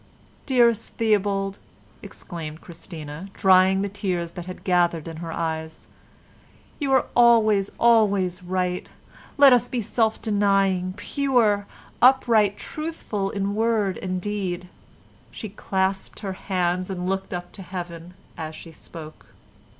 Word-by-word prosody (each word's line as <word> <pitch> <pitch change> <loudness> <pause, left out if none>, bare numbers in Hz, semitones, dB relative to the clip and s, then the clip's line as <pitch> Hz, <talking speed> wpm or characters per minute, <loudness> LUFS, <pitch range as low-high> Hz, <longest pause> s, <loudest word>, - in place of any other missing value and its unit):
"Dearest 240 -4 +3
Theobald," 200 -3 0 0.4
exclaimed 160 -3 -8
Christina, 165 -1 -9
drying 190 0 +4
the - - -1
tears 185 -4 -3
that 175 0 -8
had 185 - -8
gathered 175 -3 +1
in 165 -1 -7
her 165 0 -6
eyes, 160 -1 -4 0.9
"you 280 -3 -1
are 265 - +4
always, 220 -4 +5
always 200 -6 +3
right. 180 0 -2 0.5
Let 280 -2 +8
us 245 0 +3
be 250 -1 -2
self 220 0 0
denying, 195 -3 +1
pure, 230 -6 +1 0.3
upright, 230 -5 +5
truthful 305 -11 -4
in 200 0 -2
word 215 -3 +1
and 185 -1 -3
deed." 185 -3 -3 0.6
She 215 - -7
clasped 190 -1 -2
her 195 -3 -3
hands 185 -1 -1
and 180 -1 -3
looked 190 0 -2
up 175 0 -5
to 200 - -11
Heaven 175 -1 -7 0.2
as 155 -1 -6
she 165 - -11
spoke. 155 0 -12
195 Hz, 125 wpm, -24 LUFS, 180-215 Hz, 0.9 s, Let